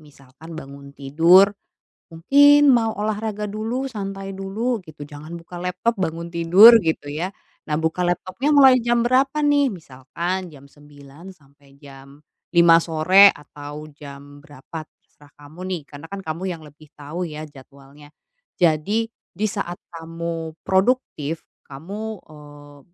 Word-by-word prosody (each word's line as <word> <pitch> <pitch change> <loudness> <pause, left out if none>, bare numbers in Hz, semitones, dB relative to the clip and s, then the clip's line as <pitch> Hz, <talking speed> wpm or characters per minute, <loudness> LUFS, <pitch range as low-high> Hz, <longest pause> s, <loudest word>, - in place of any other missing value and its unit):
misalkan 150 +2 -14
bangun 140 -2 -11
tidur, 165 +8 +4 0.6
mungkin 285 - +5
mau 225 -2 +1
olahraga 210 0 -3
dulu, 220 +6 -4
santai 195 -2 -6
dulu, 210 +5 -3
gitu, 155 -4 -12
jangan 150 +3 -10
buka 175 +1 -10
laptop, 180 +6 -1
bangun 170 0 -4
tidur, 180 +7 +7
gitu 160 -5 -3
ya. 165 +5 -3 0.4
Nah, 150 - 0
buka 160 +3 -2
laptopnya 185 +10 -2
mulai 265 -2 +7
jam 240 0 +1
berapa 265 +4 +1
nih? 285 -1 +3
Misalkan 175 - -5
jam 140 -3 -15
9:00 145 +3 -16
sampai 140 -1 -25
jam 140 +1 -16 0.3
5:00 170 -1 +7
sore, 175 +5 +5
atau 145 +1 -10
jam 145 0 -13
berapa 145 +1 -10
terserah 145 -1 -25
kamu 145 +4 -15
nih, 180 -3 -3
karena 145 +3 -10
kan 200 0 -7
kamu 160 +2 -5
yang 160 - -17
lebih 150 +1 -17
tahu 160 +5 -6
ya 155 0 -7
jadwalnya. 140 0 -16 0.5
Jadi, 180 +7 +1 0.2
di 205 +5 -5
saat 185 -4 -5 0.2
kamu 165 -1 -6
produktif, 190 - -1 0.2
kamu, 200 +10 -7
eee, 145 -1 -15
165 Hz, 135 wpm, -21 LUFS, 145-200 Hz, 0.6 s, tidur